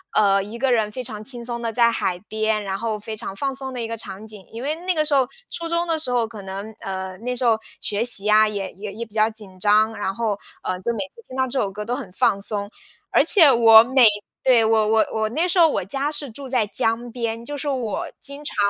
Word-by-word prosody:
呃， 195 Hz, -2 st, +4 dB
一 215 Hz, +3 st, -8 dB
个 265 Hz, +1 st, +1 dB
人 220 Hz, -3 st, +1 dB
非 255 Hz, +4 st, -5 dB
常 215 Hz, -3 st, -5 dB
轻 240 Hz, 0 st, -1 dB
松 235 Hz, -1 st, -4 dB
地 230 Hz, -1 st, -2 dB
在 235 Hz, +1 st, +4 dB
海 180 Hz, -5 st, -1 dB
边， 215 Hz, -1 st, 0 dB
然 195 Hz, -1 st, -3 dB
后 225 Hz, -2 st, -2 dB
非 220 Hz, +1 st, -6 dB
常 195 Hz, -, -5 dB
放 275 Hz, +5 st, -2 dB
松 265 Hz, 0 st, -3 dB
的 250 Hz, -, -5 dB
一 230 Hz, -, -2 dB
个 230 Hz, -, -4 dB
场 205 Hz, -1 st, -7 dB
景。 210 Hz, -3 st, -5 dB
因 230 Hz, +2 st, -7 dB
为 295 Hz, +3 st, 0 dB
那 365 Hz, -, +2 dB
个 310 Hz, -, +1 dB
时 300 Hz, -, 0 dB
候 265 Hz, -3 st, +4 dB, 0.2 s
初 335 Hz, -1 st, -3 dB
中 340 Hz, +1 st, 0 dB
的 325 Hz, -1 st, +1 dB
时 305 Hz, -, 0 dB
候， 245 Hz, -2 st, +1 dB
可 220 Hz, -2 st, -9 dB
能， 195 Hz, +3 st, -7 dB
呃， 190 Hz, -1 st, -5 dB
那 250 Hz, +3 st, -3 dB
时 250 Hz, 0 st, 0 dB
候 225 Hz, -2 st, +3 dB, 0.2 s
学 210 Hz, +2 st, -1 dB
习 225 Hz, -4 st, +3 dB
呀 215 Hz, +1 st, +5 dB
也 200 Hz, -3 st, -4 dB
也 200 Hz, +2 st, -7 dB
也 235 Hz, +2 st, -5 dB
比 215 Hz, -, -17 dB
较 220 Hz, 0 st, +3 dB
紧 205 Hz, -4 st, -8 dB
张， 215 Hz, +2 st, +3 dB
然 200 Hz, -2 st, -2 dB
后， 220 Hz, -4 st, -1 dB, 0.2 s
呃， 180 Hz, -, -2 dB
就 235 Hz, -, -1 dB
每 -, -, -5 dB
次 465 Hz, -, -15 dB
听 260 Hz, -, -9 dB
到 260 Hz, -, +2 dB
这 260 Hz, +1 st, -2 dB
首 195 Hz, -, -1 dB
歌 210 Hz, +2 st, -6 dB
都 245 Hz, +3 st, -1 dB
很 185 Hz, -, -7 dB
放 195 Hz, +2 st, +1 dB
松。 205 Hz, 0 st, -2 dB, 0.4 s
而 -, -, +5 dB
且 320 Hz, -9 st, +6 dB
我 225 Hz, -2 st, +8 dB
每 260 Hz, +1 st, +4 dB, 0.4 s
对， 250 Hz, -3 st, +5 dB
我 220 Hz, -1 st, +3 dB
我 220 Hz, 0 st, +3 dB
我 220 Hz, -1 st, -1 dB
那 320 Hz, +9 st, 0 dB
时 365 Hz, -, 0 dB
候 330 Hz, -, +8 dB
我 290 Hz, -, -1 dB
家 275 Hz, +10 st, -2 dB
是 290 Hz, -3 st, -5 dB
住 275 Hz, +4 st, -8 dB
在 245 Hz, -4 st, +2 dB
江 230 Hz, +3 st, -1 dB
边， 230 Hz, -1 st, -3 dB
就 290 Hz, +3 st, -6 dB
是 295 Hz, -, -5 dB
我 250 Hz, -7 st, -2 dB
经 285 Hz, +1 st, -7 dB
常， -, -, -5 dB
225 Hz, 280 characters per minute, -22 LUFS, 210-255 Hz, 0.4 s, 我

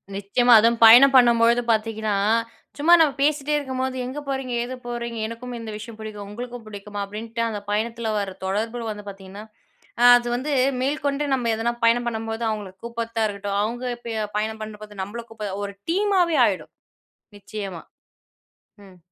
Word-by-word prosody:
நிச்சயமா 235 Hz, +5 st, +3 dB
அதுவும் 230 Hz, +1 st, +3 dB
பயணம் 250 Hz, +5 st, +9 dB
பண்ணும்பொழுது 235 Hz, -1 st, +5 dB
பார்த்தீங்கன்னா, 220 Hz, -1 st, -1 dB, 0.6 s
சும்மா 325 Hz, +4 st, +4 dB
நம்ம 300 Hz, -3 st, +3 dB
பேசிகிட்டே 295 Hz, 0 st, +1 dB
இருக்கும்போது, 260 Hz, -2 st, -3 dB
எங்கே 275 Hz, +4 st, -5 dB
போறீங்க? 265 Hz, -2 st, -3 dB
ஏது 255 Hz, +2 st, -5 dB
போறீங்க? 235 Hz, -1 st, -4 dB
எனக்கும் 240 Hz, +2 st, -7 dB
இந்த 225 Hz, -1 st, -7 dB
விஷயம் 225 Hz, 0 st, -10 dB
புடிக்கும் 210 Hz, -2 st, -7 dB
உங்களுக்கும் 240 Hz, +1 st, -8 dB
புடிக்குமா? 205 Hz, 0 st, -7 dB
அப்டின்ட்டு 225 Hz, +3 st, -5 dB
அந்த 210 Hz, -2 st, -4 dB
பயணத்ல 225 Hz, +1 st, -1 dB
வர்ற 200 Hz, -2 st, -3 dB
தொடர்பு 225 Hz, +5 st, -2 dB
வந்து 210 Hz, -1 st, -8 dB
பார்த்தீங்கன்னா, 195 Hz, +1 st, -10 dB, 0.7 s
அது 240 Hz, 0 st, -1 dB
வந்து 260 Hz, +5 st, -3 dB, 0.3 s
மேல்கொண்டு 285 Hz, +1 st, -1 dB
நம்ம 245 Hz, -3 st, -1 dB
எதனா 230 Hz, +2 st, -1 dB
பயணம் 240 Hz, +1 st, +3 dB
பண்ணும்போது, 225 Hz, 0 st, -4 dB
அவங்களுக்கு 195 Hz, -3 st, -7 dB
கூப்ட்றத்தா 230 Hz, -1 st, -2 dB
இருக்கட்டும், 200 Hz, -1 st, -3 dB
அவங்க 240 Hz, +4 st, -3 dB
இப்ப 225 Hz, -3 st, -3 dB
பயணம் 220 Hz, +1 st, -3 dB
பண்ணும்போது 210 Hz, -1 st, -9 dB
நம்மள 220 Hz, +5 st, -6 dB
கூப்ப 210 Hz, -3 st, -6 dB
ஒரு 200 Hz, 0 st, -6 dB, 0.2 s
டீமாவே 370 Hz, -3 st, +2 dB
ஆகிடும். -, -, -3 dB, 0.7 s
நிச்சயமா. 195 Hz, -4 st, -7 dB, 1.0 s
ம். 185 Hz, -1 st, -17 dB
230 Hz, 150 wpm, -23 LUFS, 210-245 Hz, 1.0 s, பயணம்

